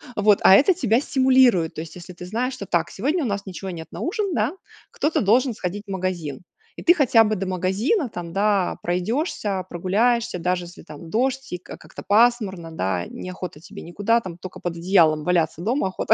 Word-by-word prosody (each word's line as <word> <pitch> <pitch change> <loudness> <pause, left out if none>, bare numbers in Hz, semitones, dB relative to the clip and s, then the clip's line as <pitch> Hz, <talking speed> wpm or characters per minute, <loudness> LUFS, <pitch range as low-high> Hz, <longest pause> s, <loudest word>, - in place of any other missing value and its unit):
Вот, 205 -1 +4
а - - +8
это 295 - +5
тебя 240 - +2
стимулирует, 260 - +3
то 155 - -4
есть 165 - -10
если 180 +1 -10
ты 180 0 -10
знаешь, 240 +8 -2
что 200 - -7
так 170 -2 0
сегодня 295 - -1
у - - -1
нас 200 -1 -3
ничего 190 0 -7
нет 160 -2 -8
на - - -7
ужин, 395 +2 -2
да, 225 +6 0 0.4
кто-то 310 - 0
должен 240 +5 +3
сходить 200 0 -5
в - - -7
магазин, 180 -7 -3 0.3
и - - -9
ты 345 - +7
хотя 255 -8 +4
бы 215 0 0
до 195 -1 -3
магазина, 195 - 0
там, 175 -5 -7
да, 200 -1 +1
пройдешься, 195 - -1
прогуляешься, 205 +4 0
даже 180 +1 -1
если 175 - -13
там 160 +2 -11
дождь 265 +5 -1
и - - -2
как 180 - -12
как-то - - -11
пасмурно, 205 -5 +2
да, 95 - -2
не 185 - -8
охота 180 -4 -7
тебе - - -11
никуда, 205 +7 +1
там, 185 -6 -8
только 185 0 -9
под 175 -1 -4
одеялом 165 -4 +3 0.3
дома 225 +3 0
охота. 190 +3 +1
195 Hz, 200 wpm, -23 LUFS, 175-240 Hz, 0.4 s, а